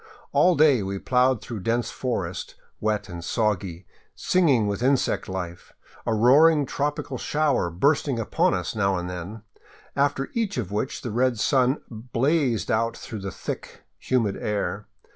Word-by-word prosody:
All 180 -1 +4
day 145 -6 +5
we 100 0 -3
plowed 125 +2 +2
through 115 -3 -6
dense 115 +5 -1
forest, 95 -9 -3 0.2
wet 105 -1 -1
and 85 -3 -7
soggy, 95 -3 -1 0.3
singing 145 -12 +3
with 100 +2 -2
insect 130 -4 +1
life, 90 -2 -6 0.3
a 115 - +2
roaring 145 +7 +5
tropical 145 -1 -3
shower 145 - +1
bursting 140 - +1
upon 110 -3 +1
us 90 +4 -3
now 100 -3 +1
and 90 0 -4
then, 90 +4 -7 0.5
after 140 -1 0
each 225 - -1
of 105 -6 -3
which 105 +6 -3
the 120 - -3
red 125 +1 +1
sun 130 +4 +2
blazed 125 +3 0
out 115 +1 0
through 110 - -7
the 95 0 -4
thick, - - -7 0.2
humid 115 -6 0
air. 105 0 -2
115 Hz, 150 wpm, -25 LUFS, 100-135 Hz, 0.5 s, day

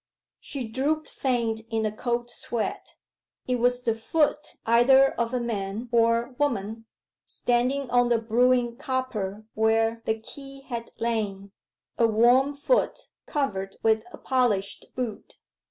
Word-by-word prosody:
She 265 -5 -5
drooped 290 +7 -1
faint 235 -4 -1
in 225 -1 0
a 215 - 0
cold 240 +1 -2
sweat. 235 -2 -4 0.5
It 250 -1 0
was 245 +1 +2
the 230 - +2
foot 300 +6 0
either 265 +4 +6
of 235 -1 -1
a 250 - 0
man 220 0 -3
or 230 +1 +2
woman, 225 -5 -1 0.4
standing 250 +3 0
on 245 0 +4
the 235 - +4
brewing 240 +1 +2
copper 255 -8 -3
where 225 +1 +2
the 220 - 0
key 275 +4 -11
had 235 -4 -6
lain. 205 -4 -2 0.5
A 230 - +5
warm 245 +6 +4
foot, 395 - +1 0.3
covered 195 -10 -2
with 220 -1 +3
a - - -10
polished 220 -7 0
boot. 245 -5 -5
235 Hz, 135 wpm, -26 LUFS, 220-255 Hz, 0.5 s, either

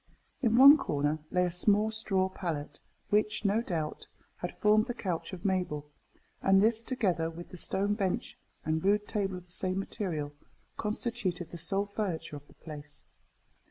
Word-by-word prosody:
In 230 -3 +3
one 280 +4 +10
corner 145 - 0
lay 180 0 +2
a 175 - -1
small 210 +5 +3
straw 195 -4 +1
pallet, 160 -6 -5 0.3
which, 210 +1 +1
no 205 +3 +3
doubt, 160 -8 -3 0.3
had 175 - -6
formed 215 +1 +4
the 245 - -3
couch 180 -7 -3
of 185 -1 -8
Mabel; 175 -6 -1 0.5
and 195 0 +5
this, 220 +2 +3
together 190 -10 0
with 170 +1 -9
the 180 - -10
stone 200 +4 +1
bench 195 -3 -2 0.3
and 160 0 0
rude 205 +1 +2
table 195 -4 -1
of 180 - -11
the 175 - -17
same 185 +1 0
material, 170 -8 -3 0.4
constituted 195 -5 -2
the 170 - -7
sole 195 +5 0
furniture 200 -7 -3
of 145 0 -15
the - - -20
place. 150 -2 -9
190 Hz, 165 wpm, -30 LUFS, 165-210 Hz, 0.5 s, one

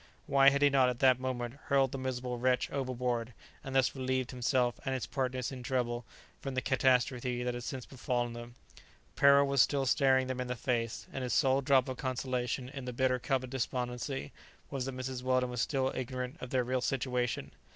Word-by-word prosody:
why 140 0 +6
had 140 +1 +1
he 145 - +7
not 130 -2 +4
at 125 - -3
that 130 -1 +4
moment 130 0 -4
hurled 135 -2 +3
the - - -4
miserable 125 -1 -3
wretch 125 0 +1
overboard, 125 -3 -2 0.3
and 135 0 -6
thus 135 0 +3
relieved 130 -1 -1
himself 125 -1 +1
and 135 -1 -1
his 130 - -3
partners 130 -2 -2
in 130 -1 -7
trouble 120 -1 -1 0.3
from 135 -2 -5
the - - +2
catastrophe 125 -2 +1
that 125 0 -1
had 120 0 -5
since 130 -1 -5
befallen 120 -2 -2
them? 120 0 -9 0.6
Peril 140 0 +6
was 140 -2 +3
still 140 0 +2
staring 130 0 +3
them 130 0 -3
in 125 - -3
the 125 - -2
face, 115 -1 -2
and 135 - -3
his 125 - -1
sole 135 -2 +3
drop 135 -1 +3
of 130 -1 -4
consolation 130 -1 -2
in 135 -1 -7
the 125 - -4
bitter 130 +1 +1
cup 130 +1 0
of 125 - -8
despondency 125 - -3 0.4
was 135 -3 -2
that 135 -1 -4
Mrs. 130 0 -4
Weldon 130 -1 +1
was 125 -1 -2
still 135 -3 0
ignorant 130 +1 -4
of 130 - -6
their 130 -1 +1
real 130 +1 -1
situation. 125 -2 -1
130 Hz, 205 wpm, -32 LUFS, 125-135 Hz, 0.6 s, he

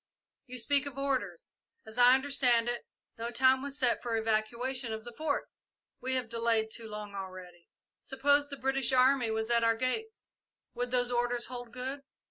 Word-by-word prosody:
You 255 0 -6
speak 280 +4 +2
of 275 -1 -8
orders. 275 -1 -2 0.3
As 220 +2 -6
I 245 +1 +8
understand 260 -4 +2
it, 240 0 -3 0.3
no 230 +1 -3
time 260 +2 +4
was 280 0 -5
set 255 -4 +2
for 240 -1 -3
the - - +1
evacuation 235 +3 -1
of 220 0 -6
the 240 +1 -10
Fort?" 305 0 -1 0.5
"We 260 +1 0
have 255 -3 -1
delayed 230 -1 0
too 225 0 -5
long 210 -1 -7
already." 185 -3 -9 0.3
"Suppose 285 +2 +2
the 280 - -6
British 270 0 0
army 255 -1 +4
was 220 +1 -2
at 235 -1 +3
our 230 0 +3
gates 440 - -3 0.4
would 245 0 -3
those 245 0 +1
orders 240 0 0
hold 245 -2 -7
good?" 260 +3 -5
245 Hz, 180 wpm, -31 LUFS, 230-265 Hz, 0.5 s, I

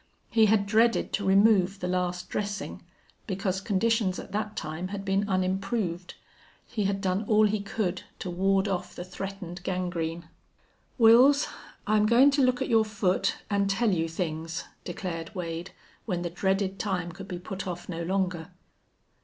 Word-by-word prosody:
He 225 -1 +5
had 205 -1 +3
dreaded 225 +3 +2
to 200 -2 -1
remove 195 -1 +4
the 180 - -3
last 180 -1 -1
dressing 205 0 -4 0.5
because 190 -1 -1
conditions 210 -1 +1
at - - -8
that 210 +1 -3
time 160 +3 -4
had 195 0 -6
been 195 +1 +1
unimproved. 185 -1 -1 0.5
He 215 -4 -2
had 195 0 0
done 190 +1 0
all 215 0 +5
he 210 0 +1
could 200 -3 -2 0.2
to 180 - -5
ward 195 +2 +2
off 190 -3 -3
the - - -5
threatened 185 -2 -7
gangrene. 175 -3 -3 0.7
"Wils, 250 +6 +7 0.4
I'm 215 0 +3
goin' 250 +5 +6
to 280 0 +2
look 255 -1 +2
at - - -4
your 225 -2 +4
foot 205 -3 0 0.2
an' 200 0 +2
tell 210 +3 +2
you 165 -3 0
things," 160 -1 -3 0.2
declared 175 -3 -5
Wade, 170 0 -4 0.4
when 180 -4 -1
the 175 - -3
dreaded 190 +1 0
time 180 -4 -2
could 195 +3 -10
be 180 -3 -5
put 190 +2 -6
off 175 -1 -5
no 170 -2 -4
longer. 180 -1 -1
195 Hz, 160 wpm, -28 LUFS, 180-210 Hz, 0.7 s, Wils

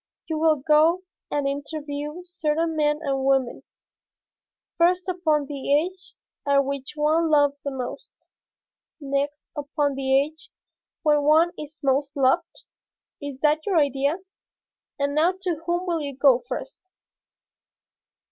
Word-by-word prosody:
You 315 -1 -3
will 320 -1 +4
go 310 +5 +3 0.3
and 285 -1 0
interview 290 +3 -4
certain 330 -2 -1
men 300 -1 +2
and 270 -2 -1
women, 270 -2 +1 1.1
first 360 +2 +2
upon 320 -5 +1
the 280 -1 -4
age 365 +4 -4 0.3
at 280 -1 +4
which 275 -1 -4
one 315 +2 +2
loves 285 -2 +3
the 280 - -3
most, 255 -2 -8 0.7
next 285 +1 -2
upon 290 0 -1
the 265 0 +2
age 310 +3 -5 0.5
when 300 -2 +4
one 315 +4 +4
is 300 0 -9
most 275 +1 0
loved? 280 +6 +1 0.6
Is 285 -2 -7
that 305 +1 +2
your 385 -4 +2
idea? 280 +1 +2 0.8
And 285 0 0
now 325 +5 +3
to 340 -4 -2
whom 345 +1 0
will 340 -3 -1
you 280 -3 -5
go 270 -3 +5
first?" 315 +8 -7
295 Hz, 130 wpm, -24 LUFS, 280-325 Hz, 1.1 s, go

